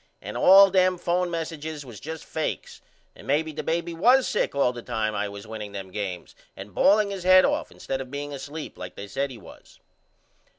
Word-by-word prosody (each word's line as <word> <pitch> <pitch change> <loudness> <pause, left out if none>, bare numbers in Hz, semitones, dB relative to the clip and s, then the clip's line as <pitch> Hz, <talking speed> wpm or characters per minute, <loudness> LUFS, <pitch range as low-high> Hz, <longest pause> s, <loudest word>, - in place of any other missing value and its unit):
And - - -8
all 195 +1 +7
them 185 -1 +3
phone 175 +1 0
messiges 160 -3 -5
was 120 -5 -10
just 160 +1 -7
fakes 160 - -4 0.3
and - - -14
maybe 155 +3 +1
the 150 - -5
baby 170 +1 -2
was 250 +10 +4
sick 210 - -1
all 135 -3 +2
the 120 - -7
time 110 -3 -2
I 105 0 -2
was 100 +1 -9
winning 110 -2 -7
them 95 -2 -7
games 90 -3 -5 0.2
and 95 +1 -10
balling 205 - +4
his 195 -2 -5
head 185 0 +7
off - - -1
instead 135 0 -4
of 130 - -8
being 145 +1 -5
asleep 145 +3 -7
like - - -8
they 100 - -8
said 135 +8 -2
he 125 - -9
was. 105 - -16
145 Hz, 205 wpm, -25 LUFS, 110-175 Hz, 0.3 s, all